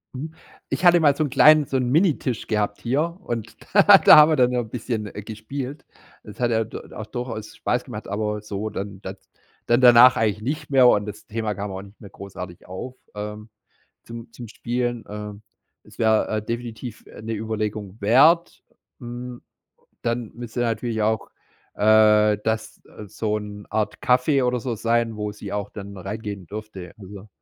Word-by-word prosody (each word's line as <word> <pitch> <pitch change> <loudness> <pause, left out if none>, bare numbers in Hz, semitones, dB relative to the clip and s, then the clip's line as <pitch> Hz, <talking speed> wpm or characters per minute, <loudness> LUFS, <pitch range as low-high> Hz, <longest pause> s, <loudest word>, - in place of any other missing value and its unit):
Mhm. 155 +5 -6 0.4
Ich 185 - -2
hatte 175 0 +7
mal 145 -3 +4
so 155 - 0
'n 145 - -2
kleinen 150 +3 +6
so 135 - -1
'n 125 -1 -1
Minitisch 145 - +1
gehabt 105 -1 -1
hier, 155 +8 -1
und 115 - -5 0.2
da 200 0 +8
da - - +8
haben 150 +1 +8
wir - - +3
dann 125 -2 +3
so - - 0
'n 115 -2 -5
bisschen 115 -2 -4
gespielt. 110 +8 -7 0.4
Das - - -12
hat 120 -1 +1
ihr 110 -1 +1
du 110 - -8 0.2
auch 110 - -6
durchaus 115 -2 -6
Spaß - - -1
gemacht, - - -8
aber 105 +1 -2
so 105 0 -4
dann 100 -1 -6
das 95 0 -7 0.5
dann 120 +2 +3
danach 125 +1 +8
eigentlich 105 -1 0
nicht 140 +7 -4
mehr, 130 -3 +6
und 105 -4 +3
das 105 -1 -9
Thema 110 -1 -3
kam 100 +1 -5
auch 95 0 -6
nicht 100 +1 -16
mehr 100 - -11
großartig 90 -3 -10
auf, 125 +8 -7 0.2
ähm, 105 +1 -7 0.5
zum 115 0 -10
zum 120 0 -10
Spielen, 120 +1 -3
ähm 105 0 -8 0.5
Es - - -18
wäre, 110 -1 +3
äh, 110 0 -1
definitiv, 115 0 -6
äh, - - -13
'ne 115 +1 -4
Überlegung 110 -2 -4
wert, 150 +11 +4 0.4
hm. 120 0 -8 0.6
Dann 115 -1 -2
müsste 120 0 -6
natürlich 115 -1 -1
auch, 110 0 0 0.4
äh, 105 0 +5
das 110 0 -3 0.3
so 105 +2 -2
'n 105 -1 -9
Art 110 0 -1
Café 130 +2 +3
oder 125 0 0
so 120 -1 -3
sein, 115 0 0
wo 105 0 -3
sie 105 -1 -9
auch 105 0 -3
dann 100 -1 -9
reingehen 100 0 -6
dürfte, 100 -3 -8
also. 100 +1 -11
110 Hz, 180 wpm, -23 LUFS, 105-125 Hz, 0.6 s, da